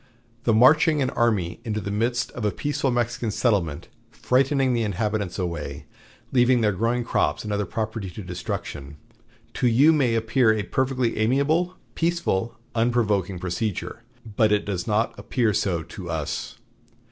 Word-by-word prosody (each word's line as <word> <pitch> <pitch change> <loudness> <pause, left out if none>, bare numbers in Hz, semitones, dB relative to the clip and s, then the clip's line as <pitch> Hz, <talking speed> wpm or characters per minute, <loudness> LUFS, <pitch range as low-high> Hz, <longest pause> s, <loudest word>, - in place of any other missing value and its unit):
The 115 - +3
marching 150 +6 +5
an 130 - -1
army 105 -8 0
into 110 -3 -2
the 100 0 -4
midst 120 +4 0
of 120 - -7
a 105 - +2
peaceful 145 +4 -1
Mexican 120 -1 -1
settlement, 100 - 0 0.2
frightening 135 0 +1
the 120 - +1
inhabitants 105 -2 -2
away, 90 -3 -4 0.5
leaving 125 -1 +4
their 105 -2 +3
growing 115 +5 0
crops 75 -9 0
and 105 -1 -3
other 100 -1 -1
property 110 -3 -3
to 100 +4 -8
destruction, 75 -5 -6 0.6
to 125 - +1
you 135 +7 +5
may 130 -7 +2
appear 115 +1 +3
a 105 -1 -1
perfectly 130 0 -1
amiable, 145 +10 +1 0.2
peaceful, 165 - -1 0.2
unprovoking 110 -6 +1
procedure; 95 +5 -3 0.2
but 110 0 +1
it 105 -1 +2
does 95 -4 -3
not 110 +1 +1
appear 115 -5 0
so 95 -5 0
to 90 0 -9
us. 80 -3 -4
110 Hz, 150 wpm, -24 LUFS, 100-125 Hz, 0.6 s, marching